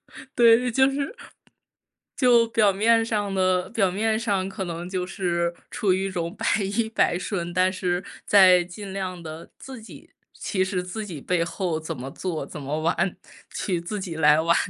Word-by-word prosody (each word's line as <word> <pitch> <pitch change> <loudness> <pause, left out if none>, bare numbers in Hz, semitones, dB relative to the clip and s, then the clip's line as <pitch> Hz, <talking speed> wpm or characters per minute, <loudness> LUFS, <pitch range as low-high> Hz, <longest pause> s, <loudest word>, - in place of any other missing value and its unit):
就 - - -11
对， 235 +1 +5
就 265 +3 +4
是 280 - -3 1.0
就 240 -3 +4
表 215 -3 +3
面 225 +4 +3
上 205 -3 -1
的 185 -1 +1
表 200 -5 +2
面 220 +4 0
上 200 -5 -1
可 195 0 -5
能 170 0 -5
就 185 -1 -2
是 175 -3 -1 0.2
处 200 - 0
于 190 +1 -1
一 195 - -3
种 170 0 -3
百 - - -5 0.2
依 210 +3 -1
百 220 -5 +1
顺。 175 -2 -3
但 185 +1 +2
是 180 -1 -1 0.2
在 185 -3 +6
尽 190 +3 -9
量 185 -2 -4
地 160 0 -9
自 260 -4 -10
己 220 - -14 0.2
其 190 -2 -2
实 190 -1 -2
自 185 +5 -5
己 160 -6 -7
背 175 +3 0
后 170 -1 -2
怎 160 -4 -6
么 135 +2 -7
做， 170 -1 -4
怎 150 - -9
么 150 +3 -3
玩， 170 +3 0 0.3
去 180 -4 -2
自 205 +4 -5
己 175 -3 -5
来 150 -1 +5
玩。 165 +1 +3
185 Hz, 200 characters per minute, -24 LUFS, 175-210 Hz, 1.0 s, 在